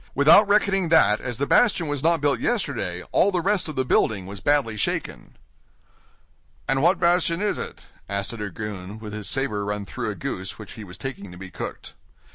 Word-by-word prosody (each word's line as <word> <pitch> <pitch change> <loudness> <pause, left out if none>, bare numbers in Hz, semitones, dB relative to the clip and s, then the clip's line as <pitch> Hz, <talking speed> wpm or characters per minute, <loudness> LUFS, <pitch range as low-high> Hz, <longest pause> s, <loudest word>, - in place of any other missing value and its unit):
Without 155 +9 +7
reckoning 195 -3 +2
that 155 -10 +5
as 120 -2 -4
the 140 - 0
bastion 190 -3 +3
was 145 -2 -2
not 165 0 +2
built 145 -1 +2
yesterday 135 - -2
all 200 - +4
the 180 - 0
rest 195 -1 0
of 155 - -6
the 130 - 0
building 105 -5 +1
was 100 +1 -8
badly 140 -5 +2
shaken." 105 - -3 1.3
"And 135 +1 +1
what 175 +5 +4
bastion 170 -1 +2
is 210 0 0
it?" - - -7 0.2
asked 100 +3 -3
a - - -7
dragoon, 105 -1 -6
with 110 -1 -8
his 105 -3 -6
saber 135 -7 -1
run 105 0 -3
through - - -4
a - - -4
goose 95 +1 -5
which 110 -3 -10
he 110 - -9
was 90 -2 -10
taking 110 -8 -7
to 90 - -11
be 95 0 -9
cooked. - - -7
130 Hz, 200 wpm, -24 LUFS, 100-165 Hz, 1.3 s, Without